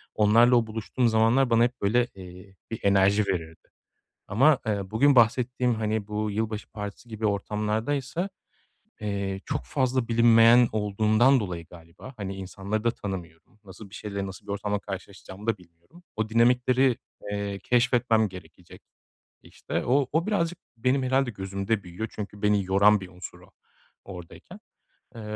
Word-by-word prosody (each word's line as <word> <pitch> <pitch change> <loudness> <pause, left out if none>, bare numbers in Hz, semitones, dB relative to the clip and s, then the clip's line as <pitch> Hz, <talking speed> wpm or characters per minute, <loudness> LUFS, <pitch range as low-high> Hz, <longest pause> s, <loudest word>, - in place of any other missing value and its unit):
onlarla 115 +4 +5
o 115 -2 +2
buluştuğum 110 +3 -1
zamanlar 115 +4 +3
bana 115 0 +4
hep 125 +1 -2
böyle, 120 +4 +2
eee, 95 +1 -12 0.2
bir 115 - -4
enerji 100 +1 +3
verirdi. 80 -3 -4 0.6
Ama, 135 +7 +4
eee, 100 -3 -2
bugün 140 +5 +3
bahsettiğim, 125 +1 +3
hani, 110 -1 -2
bu 105 0 -2
yılbaşı 110 +1 -3
partisi 105 +3 -8
gibi 110 -1 -3
ortamlardaysa, 110 - -2 0.7
eee, 100 -2 -3
çok - - -3
fazla 130 -3 0
bilinmeyen 115 +1 +6
olduğundan 110 +5 +3
dolayı 90 -6 -5
galiba, 85 +9 -13
hani, 100 -2 -5
insanları 95 +3 -4
da 120 - +2
tanımıyorum, 95 -2 -8
nasıl 100 +1 -12
bir - - -12
şeyle, 100 -2 -5
nasıl 95 +2 -11
bir - - -4
ortamda 105 0 -2
karşılaşacağımı 100 +1 -9
da 115 - +1
bilmiyorum. 85 - -21
O 110 0 -2
dinamikleri, 125 +2 +3 0.3
eee, 100 -1 -3
keşfetmem 120 -2 +2
gerekecek 90 -1 -13 0.6
işte, - - -5
o 135 +2 +2
o 165 +5 0
birazcık 175 -5 0 0.2
benim 130 +4 +1
herhâlde 130 -1 +1
gözümde 100 +2 -3
büyüyor. 90 +5 -6
Çünkü 105 -1 -8
beni 105 -2 +2
yoran 100 +2 +4
bir 95 - -8
unsur 90 0 -10
o, - - -19 0.5
oradayken. 90 -3 -11 0.6
Eee, 115 - -8
105 Hz, 145 wpm, -26 LUFS, 100-120 Hz, 0.7 s, bilinmeyen